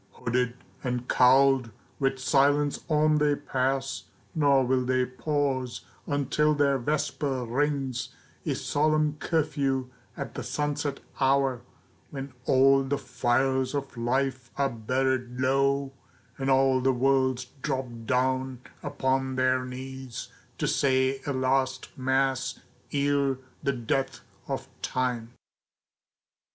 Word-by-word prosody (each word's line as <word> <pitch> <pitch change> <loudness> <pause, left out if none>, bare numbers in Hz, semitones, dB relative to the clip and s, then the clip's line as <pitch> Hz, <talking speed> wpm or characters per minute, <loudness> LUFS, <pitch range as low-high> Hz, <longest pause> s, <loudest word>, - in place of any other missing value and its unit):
Hooded 125 0 -1 0.3
and 125 -1 -2
cowled, 130 -1 +5 0.3
with 135 -1 +1
silence 145 +2 +2
on 155 0 +3
they 150 -1 +3
pass, 135 -6 -1 0.3
Nor 140 -4 +4
will 130 0 +2
they 130 0 +2
pause 130 -1 -1 0.3
until 145 +2 +1
their 140 -2 +2
vesper 140 -1 -1
rings 135 0 -1 0.3
A - - -1
solemn 155 0 +1
curfew 140 -6 0 0.3
at - - -5
the - - -5
sunset 145 -1 -2 0.2
hour, 135 -2 +2 0.5
When 135 -1 -7
all 135 +1 +5
the 135 +1 -1
fires 130 +1 0
of 140 -1 -4
life 130 +1 -1
are 140 -1 +1
buried 125 +2 -1
low, 135 +1 +2 0.4
And 135 0 -2
all 135 -1 +4
the 130 +1 +3
worlds 130 0 +2 0.2
drop 135 -2 -1 0.2
down 130 0 0 0.2
upon 130 0 -1
their 130 0 +2
knees, 130 -1 -7 0.3
To - - -1
say 130 0 +2
a - - +1
last 130 0 0
mass 130 -1 0 0.3
ere 140 -1 +1 0.2
the 140 - 0
death 130 +2 -2 0.3
of - - -3
Time. 120 -2 -2
135 Hz, 115 wpm, -27 LUFS, 130-140 Hz, 0.5 s, cowled